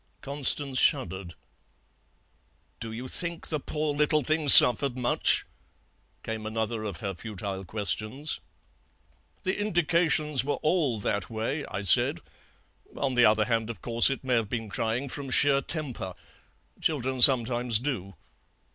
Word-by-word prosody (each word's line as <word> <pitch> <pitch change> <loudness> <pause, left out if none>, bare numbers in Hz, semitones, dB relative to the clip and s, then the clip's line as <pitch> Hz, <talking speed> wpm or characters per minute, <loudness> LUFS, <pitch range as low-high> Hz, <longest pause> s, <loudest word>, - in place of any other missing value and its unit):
"Constance 140 -1 +1
shuddered. 95 - -1 1.4
'Do 115 -1 -7
you 120 +3 -8
think 170 +4 -6
the 155 - -3
poor 150 +1 -4
little 150 +1 0
thing 155 +1 -1
suffered 130 +1 +9
much?' 125 -1 +1 0.8
came 110 -1 -6
another 110 0 -4
of 100 -5 -7
her 100 -2 -4
futile 100 0 -7
questions. 110 - -4 1.0
"'The 190 +2 -2
indications 165 -7 0
were 145 - -2
all 150 -9 0
that 100 -2 -4
way,' 115 +7 -4
I 100 +2 -6
said; 95 - +4 0.8
'on 135 -2 -2
the 120 -1 +3
other 105 0 +2
hand, 115 -1 -2
of 115 -6 -9
course, 115 +1 +4
it 135 - -5
may 130 -1 -2
have 115 -4 -1
been 115 -3 -5
crying 115 +6 -3
from 135 +1 -6
sheer 140 +1 +3
temper. 135 - -5 0.7
Children 130 -4 -2
sometimes 120 -2 +4
do.' 105 -7 -5
125 Hz, 135 wpm, -26 LUFS, 110-145 Hz, 1.4 s, suffered